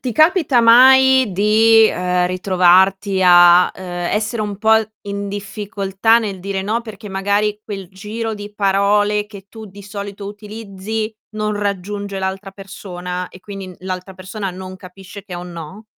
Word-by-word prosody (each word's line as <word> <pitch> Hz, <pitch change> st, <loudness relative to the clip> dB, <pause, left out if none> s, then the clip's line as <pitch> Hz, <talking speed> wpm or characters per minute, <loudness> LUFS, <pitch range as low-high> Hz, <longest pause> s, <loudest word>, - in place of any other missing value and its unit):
ti 250 Hz, -, -4 dB
capita 310 Hz, -, +3 dB
mai 260 Hz, +1 st, +6 dB
di, 220 Hz, +3 st, +4 dB
ehm, 180 Hz, -2 st, 0 dB
ritrovarti 190 Hz, +2 st, +2 dB
a, 175 Hz, 0 st, +6 dB
ehm, 175 Hz, -2 st, -5 dB
essere 215 Hz, +2 st, -2 dB
un 205 Hz, -1 st, -3 dB
po' 220 Hz, +2 st, +4 dB, 0.3 s
in 200 Hz, 0 st, -5 dB
difficoltà 205 Hz, +1 st, 0 dB
nel 200 Hz, -5 st, -5 dB
dire: 195 Hz, 0 st, -3 dB
"no", 220 Hz, +4 st, -1 dB
perché 220 Hz, -2 st, -10 dB
magari 205 Hz, +2 st, -1 dB
quel 195 Hz, -3 st, -7 dB
giro 220 Hz, +4 st, -5 dB
di 205 Hz, -1 st, -8 dB
parole 205 Hz, +1 st, +1 dB
che 200 Hz, -2 st, -13 dB
tu 220 Hz, -1 st, -10 dB
di 200 Hz, 0 st, -13 dB
solito 200 Hz, 0 st, -8 dB
utilizzi, 210 Hz, +1 st, -6 dB, 0.2 s
non 215 Hz, 0 st, -1 dB
raggiunge 200 Hz, 0 st, -4 dB
l'altra 190 Hz, +1 st, -4 dB
persona 180 Hz, -2 st, -7 dB
e 185 Hz, -, -15 dB
quindi 195 Hz, 0 st, -8 dB
n 180 Hz, -, -12 dB
l'altra 185 Hz, 0 st, -6 dB
persona 190 Hz, +2 st, -6 dB
non 185 Hz, +1 st, -9 dB
capisce 190 Hz, +2 st, -12 dB
che 190 Hz, -2 st, -9 dB
è -, -, -5 dB
un 175 Hz, 0 st, -8 dB
no? 170 Hz, +6 st, -9 dB
200 Hz, 160 wpm, -18 LUFS, 190-215 Hz, 0.3 s, mai